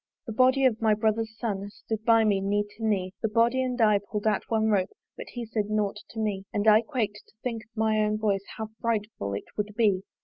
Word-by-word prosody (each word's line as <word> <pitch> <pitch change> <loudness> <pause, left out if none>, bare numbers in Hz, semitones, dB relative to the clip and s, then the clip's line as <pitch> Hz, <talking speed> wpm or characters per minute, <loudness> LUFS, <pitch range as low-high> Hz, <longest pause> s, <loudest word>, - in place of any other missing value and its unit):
The 225 - -5
body 260 +3 +4
of 230 -4 +2
my 220 -1 +4
brother's 220 +1 0
son 200 -4 -3
Stood 220 +1 -5
by 225 -1 +5
me 205 -3 +2
knee 205 +1 +1
to 225 - -9
knee: 190 -4 0
The 225 - 0
body 235 +4 +3
and 255 -1 -2
I 210 -3 +5
pull'd 205 +1 -5
at 215 -2 +2
one 220 -1 +2
rope, 190 -2 +2 0.3
But - - -8
he 240 -1 -4
said 215 -2 -2
nought 210 -2 0
to 225 - -7
me 200 -3 -2
And 205 +1 -1
I 215 +1 +7
quak'd 220 -4 -3
to - - -25
think 230 -3 -3
of - - -39
my 220 0 +2
own 210 0 +1
voice 200 -2 0
How 220 -1 -4
frightful 210 - -2
it 100 - -8
would 210 0 -3
be! 205 -5 +3
215 Hz, 235 wpm, -27 LUFS, 205-225 Hz, 0.3 s, I